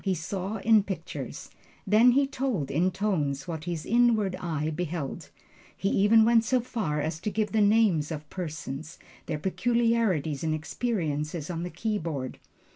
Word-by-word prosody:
He 190 -2 +1
saw 190 +5 -4
in 220 +1 +5
pictures, 195 -1 -6 0.3
then 220 +5 +6
he 280 +2 +4
told 255 - -2
in 175 +6 +2
tones, 160 -9 -1
what 160 -2 -5
his 170 -3 -3
inward 225 -5 +3
eye 155 -3 -2
beheld. 165 -3 -4 0.5
He 195 - 0
even 220 +3 +5
went 230 -1 +5
so 255 +3 +2
far 215 -11 -2
as 155 +2 -2
to 195 - -2
give 210 -1 -1
the 220 - +2
names 205 -7 +3
of 155 -1 -5
persons, 155 -3 -6 0.3
their 155 - -2
peculiarities 210 - +1
and 155 -1 +1
experiences 155 -4 -2
on 165 -1 -3
the 175 - -3
keyboard. 165 - -3
185 Hz, 155 wpm, -27 LUFS, 155-220 Hz, 0.5 s, then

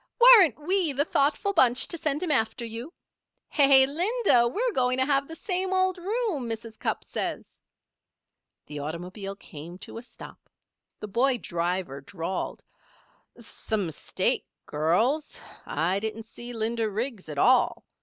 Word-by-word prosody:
"Weren't 430 - +8
we 345 0 0
the 285 +2 +1
thoughtful 310 +8 +1
bunch 250 -7 +3
to - - -4
send 310 -1 -2
him 345 - -1
after 235 -2 0
you?" 230 +7 -6 0.6
"Hey, 275 -2 +6
Linda! 345 - +2
we're 470 - -1
going 255 -3 +1
to 260 - +3
have 275 0 +1
the 325 - -8
same 370 +2 -2
old 375 -1 +1
room, 380 - -2
Mrs. 225 0 -6
Cupp - - -2
says." - - -5 1.1
The 150 -1 -7
automobile 180 +7 -6
came 170 -2 -10
to 225 - -8
a - - -9
stop. 250 - -14 0.5
The 210 - -5
boy 245 +5 +2
driver 170 - -3
drawled: 170 +5 -5 0.7
"Some 220 -3 -3
mistake, 160 -3 -1 0.2
girls. 220 - 0 0.3
I 180 +4 0
didn't 220 +1 -4
see 240 +2 -9
Linda 225 -1 -1
Riggs 215 - -4
at 150 - -6
all. 250 - +3
245 Hz, 145 wpm, -26 LUFS, 200-310 Hz, 1.1 s, Weren't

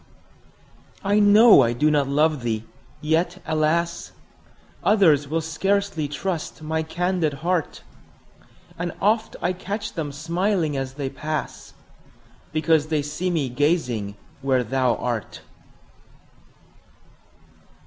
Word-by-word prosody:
I 205 +1 +2
know 210 +2 +7
I 120 0 +2
do 150 +6 +2
not 145 -2 +2
love 150 +1 +2
thee! 115 -2 -2 0.4
yet, 170 +4 0
alas! 165 +2 0 0.7
Others 160 -9 +4
will 165 +3 -1
scarcely 195 0 -1
trust 155 +2 -4
my 160 +1 -1
candid 175 -1 -1
heart; 180 -3 -1 1.0
And 175 -1 -3
oft 215 +3 +1
I 180 - +1
catch 205 +3 -5
them 155 -4 -4
smiling 165 +2 -1
as 135 -1 -4
they 140 -2 -4
pass, 155 +2 -5 0.8
Because 155 -1 +2
they 155 -2 0
see 155 +5 -3
me 160 -6 0
gazing 125 - 0 0.3
where 130 -2 +1
thou 125 +1 +1
art. 120 -5 -4
155 Hz, 110 wpm, -23 LUFS, 140-180 Hz, 1.0 s, know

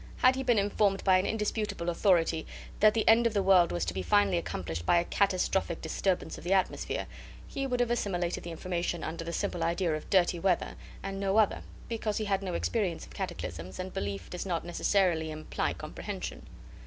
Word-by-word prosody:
Had 255 +1 +5
he 265 - -2
been 245 -3 +2
informed 200 -1 +2
by 185 -1 +5
an 185 - -1
indisputable 210 -4 -2
authority 170 -3 +2 0.3
that 215 +1 +5
the 220 - 0
end 230 +1 +6
of 220 - -4
the 200 - +2
world 185 -3 +5
was 85 -1 -1
to 85 - -2
be 95 - -2
finally 95 +1 +3
accomplished 85 0 -4
by 175 - +4
a 170 - +3
catastrophic 190 -2 +1
disturbance 175 +1 -1
of - - -13
the 180 +3 +1
atmosphere, 190 -1 0 0.4
he 275 0 -3
would 250 -1 -1
have 240 -1 +1
assimilated 180 -7 -1
the 170 - -6
information 175 0 -3
under 165 +1 -4
the 170 - -5
simple 170 0 -2
idea 170 -1 +1
of 155 - -7
dirty 175 -2 +3
weather, 185 -1 +1 0.3
and 195 0 -4
no 195 +1 +1
other, 215 -3 +3 0.3
because 220 -2 -2
he 215 - -1
had 195 -1 0
no 185 -3 -3
experience 190 -6 -1
of - - -15
cataclysms, 85 +3 -5
and 185 0 -5
belief 100 -2 -4
does 180 - -5
not 175 -4 -2
necessarily 175 -2 +1
imply 155 0 -2
comprehension. - - -6
180 Hz, 200 wpm, -30 LUFS, 165-205 Hz, 0.4 s, end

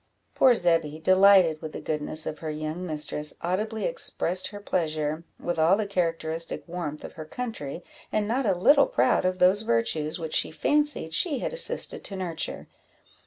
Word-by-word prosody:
Poor 255 -2 +5
Zebby, 165 -6 +1
delighted 185 -2 +5
with 155 - -7
the - - -5
goodness 155 0 -3
of 155 - -5
her 160 - -5
young 155 +3 -4
mistress, 150 -1 -3
audibly 215 +6 -2
expressed 185 - 0
her 205 - -9
pleasure, 155 -5 -2 0.2
with 175 -1 -3
all 165 +4 +5
the 215 - -1
characteristic 165 -3 -1
warmth 165 -4 -5
of - - -8
her 155 - -8
country, 175 - -6 0.3
and 210 -1 0
not 245 +2 0
a 195 - +2
little 280 +10 +5
proud 125 +8 +2
of 185 0 0
those 185 +3 +4
virtues 150 - 0
which 160 -3 -6
she - - +2
fancied 295 - 0
she 305 - +1
had 375 - -3
assisted - - +2
to 200 - -3
nurture. 175 -4 -4
175 Hz, 170 wpm, -26 LUFS, 155-205 Hz, 0.3 s, Poor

